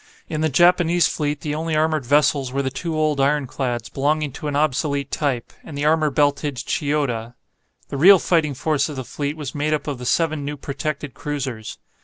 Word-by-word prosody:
In 155 -1 -3
the 160 - +2
Japanese 175 +3 +4
fleet 150 -1 -2
the 150 - -3
only 160 +1 -2
armoured 155 -3 +1
vessels 145 -2 +3
were 140 +1 -1
the 130 - -2
two 160 +4 -3
old 155 -2 +1
ironclads, 135 -4 0
belonging 150 +1 0
to 150 - -6
an 145 - -2
obsolete 140 -1 0
type, 135 -6 -2
and 145 - -8
the 145 - -1
armour 155 0 +3
belted 145 0 +1
"Chiyoda." 125 -3 -2 0.5
The 140 - -4
real 190 +7 +8
fighting 160 -5 +1
force 155 +3 0
of 150 - -6
the 130 - -4
fleet 145 +4 -4
was 145 -3 -5
made 150 +1 0
up 150 - -5
of 145 -4 -4
the 125 - -5
seven 155 -2 +1
new 145 +1 -4
protected 145 0 -4
cruisers. 135 -6 -5
145 Hz, 195 wpm, -22 LUFS, 135-155 Hz, 0.5 s, real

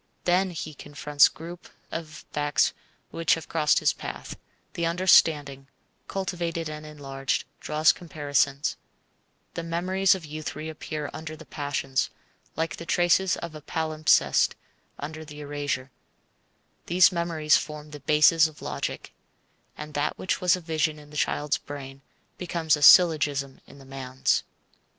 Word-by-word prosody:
Then 185 +2 +2
he 155 -3 -6
confronts 145 0 +2
groups 170 +2 -10 0.2
of 155 -2 -7
facts 145 0 +2 0.4
which 165 -1 +2
have 165 - -9
crossed 155 -2 +2
his - - +3
path; - - -7 0.4
the 170 - -3
understanding, 150 -6 +3 0.4
cultivated 170 -4 -3
and 155 0 -7
enlarged, 135 -3 -3 0.2
draws 155 +1 +3
comparisons; 145 -3 -1 0.8
the - - -4
memories 185 +3 +2
of 180 -4 -8
youth 155 +1 -6
reappear 155 -1 -5
under 155 0 -7
the 160 +1 -13
passions, 145 -2 -2 0.5
like 165 +1 -2
the 170 - -8
traces 175 +1 +3
of 170 -2 -7
a 155 - -9
palimpsest 155 +1 +2 0.4
under 155 +2 -6
the 150 -1 -11
erasure; 145 -2 -3 1.0
these 180 +2 +6
memories 170 -3 +2
form 150 0 -7
the 150 - -8
bases 155 +3 +5
of 155 - -14
logic, - - -4 0.6
and 150 0 -8
that 145 +1 -1
which 185 - -2
was 180 -1 +4
a 180 - -7
vision 155 -2 -1
in 150 -1 -15
the - - -12
child's 145 0 0
brain 135 -1 -9 0.4
becomes 165 -3 +1
a 150 - -7
syllogism 145 -5 +5
in - - -15
the 135 - -14
man's. 130 -1 -1
155 Hz, 140 wpm, -26 LUFS, 145-165 Hz, 1.0 s, these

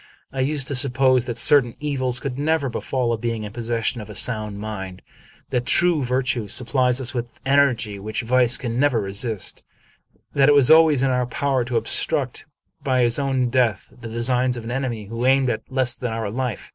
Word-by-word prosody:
I 135 - -5
used 135 0 -1
to - - -2
suppose 130 -2 +3
that 120 -1 -4
certain 125 -3 +4
evils 130 -4 -1
could 135 0 -5
never 150 -2 0
befall 125 0 -2
a 115 - -3
being 115 -1 -3
in 105 -1 -8
possession 115 0 -2
of 105 - -11
a 105 - -9
sound 110 -4 -1
mind; 95 -3 -7 0.5
that 125 0 -1
true 170 -3 +4
virtue 125 -3 -1
sup 120 +4 -2
plies 125 -2 +2
us 130 -1 -2
with 120 -1 -6
energy 125 -7 +1
which 110 +4 -4
vice 125 +1 +3
can 120 -1 -4
never 140 -4 +2
resist; 100 +1 -3 0.7
that 140 0 +4
it 145 - +5
was 140 -1 +5
always 160 -4 +5
in 135 - +2
our 125 -1 0
power 135 -1 -1
to 120 -1 -1
obstruct, - - 0 0.4
by 130 -2 +1
his 120 +3 +1
own 130 -3 0
death, 120 -4 0
the 115 - -7
de 115 +1 -4
signs 125 0 +1
of 120 - -7
an 115 - -6
enemy 125 -5 -3
who 115 +3 -5
aimed 135 -1 +3
at 110 - -4
less 130 -1 +1
than 125 -2 -4
our 110 -2 -4
life. 125 -2 -4
125 Hz, 205 wpm, -22 LUFS, 115-135 Hz, 0.7 s, it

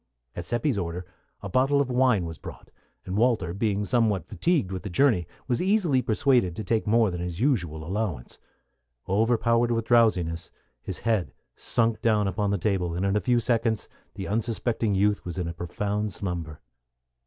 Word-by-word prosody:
At 85 +1 -6
Seppi's 120 -1 0
order 90 0 -4 0.4
a - - -3
bottle 135 +3 +3
of 135 -2 0
wine 125 -7 +3
was 80 -1 -7
brought, - - -11 0.3
and 95 - -4
Walter, 110 -6 +2
being 105 0 0
somewhat 110 - +1
fatigued 155 - 0
with 95 -1 -4
the 105 - -6
journey, 95 - +2 0.2
was 120 -2 0
easily 180 -9 +2
persuaded 115 -6 +2
to 110 - -4
take 110 -1 0
more 110 -2 +3
than 90 0 -4
his 90 0 -4
usual 90 - 0
allowance. 90 - -4 0.7
Overpowered 115 +3 +2
with 115 -1 0
drowsiness, 95 -9 +2 0.3
his 95 +6 -5
head 110 -6 -1 0.2
sunk 115 -1 0
down 110 -3 +2
upon 100 +2 -1
the 100 - +1
table, 90 -3 -1
and 90 +3 -1
in 100 +1 +1
a 105 - +2
few 125 -1 +2
seconds 115 -2 0 0.3
the 95 -1 -5
unsuspecting 115 0 -1
youth 100 +1 +2
was 90 0 -6
in 90 -2 -2
a 85 - -4
profound 100 +4 -3
slumber. 85 -5 -5
105 Hz, 175 wpm, -26 LUFS, 90-120 Hz, 0.7 s, bottle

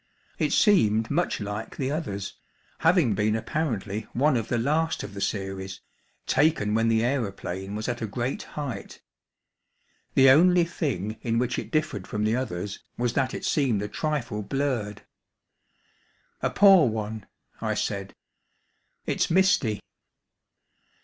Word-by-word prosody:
It - - +1
seemed 110 - +3
much 170 +4 0
like 105 +1 -5
the 135 0 -1
others, 100 - -3 0.5
having 165 - +4
been 105 +2 +1
apparently 110 -6 -2
one 140 +3 +3
of 115 -3 -1
the 120 - 0
last 155 +7 0
of 100 - -7
the 100 - -6
series, 95 -1 -3 0.5
taken 145 -10 +2
when 115 +1 +2
the 115 0 +3
aeroplane 100 -6 -3
was 110 +1 -3
at 120 -1 -3
a 110 - -1
great 120 +5 -3 0.2
height. 130 -10 -5 1.2
The 135 0 +7
only 175 +5 +6
thing 115 - -3
in 115 -1 0
which 125 +1 0
it - - -7
differed 155 -12 -1
from 105 0 -2
the 110 +2 +2
others 100 -6 -4
was 120 -1 0
that 130 -1 0
it - - -5
seemed 125 -9 +1
a - - -2
trifle 125 -7 -2
blurred. 120 -4 -2 1.4
"A - - +1
poor 195 -7 +6
one," 110 -1 -4 0.3
I - - -1
said; - - -3 0.9
"it's - - 0
misty." 170 - +3
115 Hz, 140 wpm, -26 LUFS, 105-145 Hz, 1.4 s, The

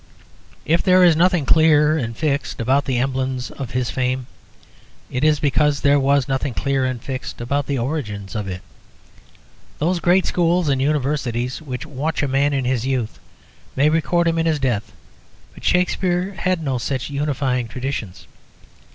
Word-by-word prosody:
If 165 +2 +2
there 185 -1 +5
is 170 -3 +6
nothing 175 -2 +3
clear 155 0 +4
and 115 -7 -3
fixed 145 -3 -1
about 135 +5 +2
the 130 -2 -1
emblems 130 0 -2
of 135 -3 -6
his 125 -1 -2
fame, 130 0 -1 0.9
it 125 - -2
is 155 -1 +3
because 145 0 +1
there 145 0 +4
was 140 -1 +2
nothing 135 -1 -2
clear 135 -1 0
and 130 -2 -2
fixed 130 +2 -6
about 140 +4 -1
the 140 - -1
origins 115 -7 -4
of 105 -3 -3
it. 95 -1 -5 1.2
Those 175 +4 0
great 180 +2 +3
schools 175 -2 +1
and 135 -1 +1
Universities 135 -3 -1
which 130 -2 -6
watch 150 +1 -2
a - - +1
man 140 +2 +2
in 135 -2 -1
his 125 -2 0
youth 130 -4 -2 0.6
may 140 +3 +4
record 170 +2 +1
him 165 0 +1
in 165 - +1
his 160 -2 +2
death; 120 -6 -1 0.6
but - - -15
Shakspere 180 +1 +1
had 185 -3 -1
no 135 -4 -1
such 130 +2 -3
unifying 135 -4 -1
traditions. 120 -5 -5
140 Hz, 165 wpm, -21 LUFS, 130-155 Hz, 1.2 s, is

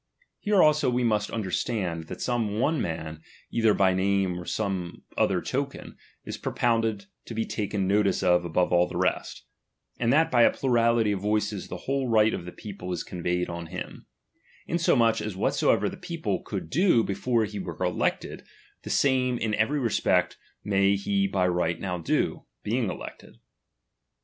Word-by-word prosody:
Here 205 -2 +3
also 150 -3 +4
we 125 0 0
must 105 -3 +1
understand, 95 -5 -2
that - - -7
some 120 -3 0
ojie 130 +9 0
man, 80 -4 -4 0.3
either 110 -2 +3
by 95 -1 +3
name 95 -1 +1
or 90 - -8
some 95 -5 -3
other - - +1
token, - - -4 0.3
is - - -6
propounded 115 -4 0 0.2
to 115 - -7
be 115 0 0
taken 100 -2 -2
notice 100 0 +2
of 90 -1 +4
above 90 +1 0
all 90 0 +4
the - - -6
rest; - - -1 0.5
and 120 0 +2
that 155 +4 +3
by 120 - +4
a - - +7
plurality 115 -4 +2
of 100 - -1
voices 105 0 -1
the 90 - -6
whole 135 -1 -1
right 110 -1 +4
of - - -4
the 90 - -7
peo 105 +2 -9
ple 90 +1 -5
is 90 - -2
conveyed 90 0 -2
on 85 -1 -6
him; 90 +2 -8 0.6
insomuch 120 -9 +2
as 105 -3 -4
whatsoever - - +2
the - - -6
people - - -3
eonld 80 - -5
do 170 - +4
before 115 +3 0
he 105 -1 -6
were - - -6
elected, - - -1 0.4
the - - -8
same 130 -2 +2
in 110 -2 -2
every 110 +8 +1
respect 90 -7 +1 0.3
may 100 -1 +3
he 100 0 0
by 95 -2 +1
right 85 -2 0
now 90 -2 -3
do, 80 - -1 0.2
being 115 0 0
elected. - - -9
105 Hz, 170 wpm, -26 LUFS, 90-115 Hz, 0.6 s, a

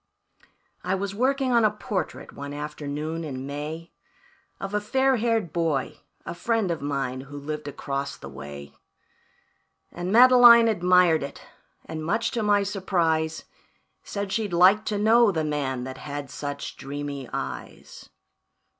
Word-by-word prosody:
"I 185 +1 0
was 195 +1 -3
working 260 +4 +1
on 235 -2 +4
a 215 - +5
portrait, 210 -4 -5
one 140 0 -7
afternoon 150 +2 -4
in 135 -4 -5
May, 150 +4 -6 0.7
Of 195 +1 -5
a 210 - +1
fair 265 +4 +2
haired 225 -7 0
boy, 160 -6 -1 0.3
a - - -4
friend 220 0 0
of 165 - -3
mine, 135 -3 -2
who 140 +2 -10
lived 150 +1 -5
across 140 -1 -4
the - - -10
way. 70 0 -9 1.2
And 175 +2 -4
Madeline 240 0 +8
admired 180 -5 +4
it, 140 0 -7 0.4
and 160 -1 -6
much 225 +8 0
to 235 - -2
my 205 -1 +3
surprise, 170 -5 0 0.6
Said 200 -1 -5
she'd 210 -3 -1
like 190 +5 +5
to 210 - -1
know 225 +1 +5
the 160 -4 -1
man 140 -4 -2
that 130 +1 -7
had 145 -2 -6
such 145 -1 -6
dreamy 140 -1 -6
eyes. - - -7
170 Hz, 145 wpm, -25 LUFS, 145-210 Hz, 1.2 s, Madeline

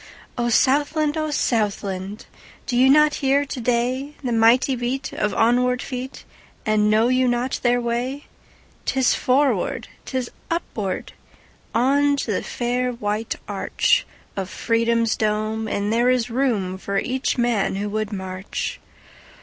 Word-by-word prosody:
O 240 -1 0
Southland! 290 +5 +2
O 310 -1 -1
Southland! 205 -6 -1 0.4
Do 245 - -2
you 255 +2 +5
not 300 +1 +6
hear 275 +1 +3
to 265 -2 -5
dayThe 250 +3 -1
mighty 230 +4 +4
beat 250 +3 -3
of 210 - 0
onward 250 +2 +3
feet, 255 +1 -6 0.4
And 215 -1 +3
know 220 +2 +4
you 255 0 +3
not 245 +1 0
their 245 0 +3
way?'Tis 250 +2 -3
forward, 270 +2 +1 0.2
'tis 255 -2 -3 0.2
upward, 215 - -3 0.6
On 285 +4 +3
to 260 -5 -2
the 200 - 0
fair 250 +1 -1
white 215 -1 -2
archOf - - +1 0.4
Freedom's 230 +1 +1
dome, 215 +1 -1
and 205 +1 -1
there 240 +2 +3
is 250 -1 +1
roomFor 200 -6 0
each 260 +1 -1
man 235 -6 +1
who 200 +1 -2
would 215 0 -2
march. 190 -1 -4
240 Hz, 125 wpm, -22 LUFS, 215-260 Hz, 0.6 s, not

